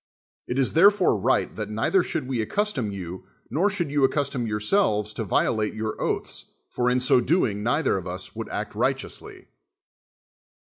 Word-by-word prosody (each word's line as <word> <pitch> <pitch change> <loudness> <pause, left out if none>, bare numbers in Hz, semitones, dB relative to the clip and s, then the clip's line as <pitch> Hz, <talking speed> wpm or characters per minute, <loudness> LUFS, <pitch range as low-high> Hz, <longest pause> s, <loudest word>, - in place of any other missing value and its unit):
It 125 - -2
is 135 -2 +2
therefore 190 - +5
right - - +1
that 105 -1 -4
neither 110 - +2
should 160 -6 -3
we 130 -3 -2
ac 110 - -3
custom 205 - -1
you, 90 -2 -7 0.3
nor 170 - +2
should 175 -7 -2
you 145 -1 +1
accustom 135 -3 0
yourselves 105 - +1
to 110 - -3
violate 110 +2 0
your 110 0 -4
oaths; - - -2 0.3
for 125 0 +1
in 125 +1 +2
so 125 0 +4
doing 120 - +1
neither 125 +3 +1
of 90 - -9
us 90 +1 -6
would - - -5
act - - -4
righteously. - - -3
125 Hz, 170 wpm, -25 LUFS, 105-155 Hz, 0.3 s, therefore